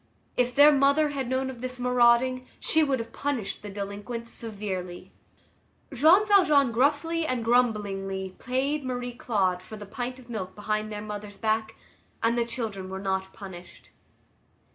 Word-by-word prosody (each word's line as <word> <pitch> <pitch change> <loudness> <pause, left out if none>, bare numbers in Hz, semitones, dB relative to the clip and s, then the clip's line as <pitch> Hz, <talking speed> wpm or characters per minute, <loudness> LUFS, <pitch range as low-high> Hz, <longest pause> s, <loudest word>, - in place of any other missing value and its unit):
If 250 0 +1
their 290 +1 +8
mother 280 +2 +4
had 270 -4 -3
known 260 0 0
of 240 -2 -11
this 255 0 -5
marauding, 250 +1 +3
she 320 - +2
would 275 -3 +1
have 230 -1 -7
punished 270 -8 -3
the 205 - -7
delinquents 205 +4 -5
severely. 195 -5 -5 0.8
Jean 320 - +6
Valjean 305 - +5
gruffly 300 +7 +1
and 250 -4 -1
grumblingly 200 -5 0
paid 270 +4 -1
Marie 245 -1 -3
Claude 195 -7 0
for 215 +3 -10
the 205 - -8
pint 245 +5 -5
of 255 -2 -15
milk 190 -6 -5
behind 215 +1 -2
their 210 0 -5
mother's 210 -1 -7
back, 220 0 -1 0.5
and 230 +1 +3
the 235 -1 +1
children 220 -6 -4
were 190 0 -5
not 190 -1 -2
punished. 180 -3 -11
235 Hz, 155 wpm, -27 LUFS, 205-260 Hz, 0.8 s, their